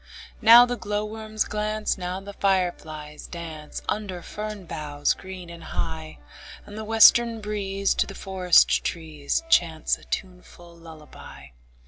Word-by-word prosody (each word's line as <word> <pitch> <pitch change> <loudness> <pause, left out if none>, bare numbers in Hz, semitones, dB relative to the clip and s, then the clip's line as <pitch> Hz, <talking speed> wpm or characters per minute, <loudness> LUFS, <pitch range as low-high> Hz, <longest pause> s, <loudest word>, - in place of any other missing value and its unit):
Now 235 +2 +9
the 245 0 -3
glowworms 215 +1 -3
glance, 215 0 -2
Now 180 0 -4
the 200 +1 -10
fireflies 165 -6 -2
dance, 160 -3 -8
Under 190 -5 -3
fern 210 -2 -6
boughs 150 -3 -1
green 190 -2 -10
and 170 -1 -11
high; 160 -1 -5 0.5
And 205 - -11
the 220 - -5
western 225 +1 +5
breeze 200 -2 -1
To - - 0
the - - -9
forest 185 -2 +3
trees 160 - -3
Chants 165 - +2
a - - -19
tuneful 180 -2 -7
lullaby. 155 - -13
190 Hz, 130 wpm, -25 LUFS, 165-210 Hz, 0.5 s, Now